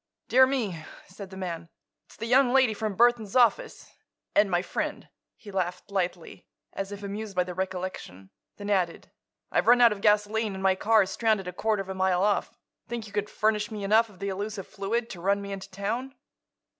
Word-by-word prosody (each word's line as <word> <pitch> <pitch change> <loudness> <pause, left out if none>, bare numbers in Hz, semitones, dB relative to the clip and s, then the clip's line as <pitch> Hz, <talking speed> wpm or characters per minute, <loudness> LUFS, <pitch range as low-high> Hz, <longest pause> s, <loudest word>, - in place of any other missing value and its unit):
"Dear 260 +1 +6
me!" 215 - -2 0.2
said 190 +1 -10
the 190 - -10
man; 170 -3 -5 0.4
"it's - - -17
the 225 - -5
young 250 +1 +4
lady 260 -4 +4
from 215 -2 -3
Burthon's 235 -3 +3
office—and 220 -3 0
my 175 -1 +1
friend." - - -4 0.3
He 205 - -11
laughed, 180 0 -3
lightly, 180 -3 -3 0.3
as 195 0 -4
if 205 0 -8
amused 200 0 -5
by 180 - +3
the 180 0 -7
recollection; 180 - -5 0.3
then 205 0 -4
added: 180 -4 -1 0.4
"I've - - +1
run 245 +1 +7
out 240 -1 +7
of 205 -1 -4
gasoline 210 0 +2
and 190 - -6
my 190 0 +5
car 215 +3 +4
is 190 - -6
stranded 215 -5 +1
a 180 - -5
quarter 215 +1 0
of 190 - -15
a - - -2
mile 190 -1 +1
off. 205 0 0 0.3
Think 235 -1 -5
you 205 - -13
could 205 0 -1
furnish 215 -1 0
me 210 -2 -6
enough 220 +3 +4
of 200 - -17
the 200 +2 -3
elusive 200 +1 -4
fluid 225 +4 -2
to 175 - -8
run 200 +2 +2
me 200 0 -7
into 195 -1 -6
town?" 230 +8 -4
200 Hz, 200 wpm, -27 LUFS, 190-220 Hz, 0.4 s, run